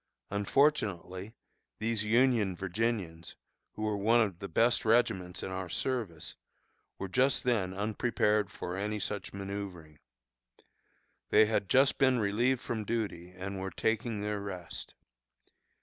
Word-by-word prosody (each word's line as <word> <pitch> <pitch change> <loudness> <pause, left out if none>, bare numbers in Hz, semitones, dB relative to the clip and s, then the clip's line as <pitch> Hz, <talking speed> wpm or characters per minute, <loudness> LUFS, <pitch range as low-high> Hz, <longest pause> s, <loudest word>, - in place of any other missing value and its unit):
Unfortunately, 100 - +1 0.4
these 110 -1 -1
Union 115 -3 +3
Virginians, 95 -3 -2 0.4
who 110 - -5
were 105 -1 0
one 110 +4 +4
of 100 -6 +1
the 100 - -5
best 115 +8 +3
regiments 110 -6 +2
in 95 - -4
our 95 -1 -4
service, 105 -7 -2 0.6
were 95 - -4
just 130 +8 +2
then 110 -7 +1
unprepared 105 0 +1
for 90 -1 -5
any 105 +2 -2
such 100 +1 -3
manoeuvring. 95 -6 -6 1.3
They 110 - +6
had 105 -2 0
just 135 +1 +4
been 130 -2 +4
relieved 120 +4 +1
from 110 -2 -3
duty, 105 -6 -3
and 95 +1 -6
were 95 0 -3
taking 110 +3 -1
their 105 0 -2
rest. 90 -4 -6
105 Hz, 130 wpm, -31 LUFS, 95-115 Hz, 1.3 s, They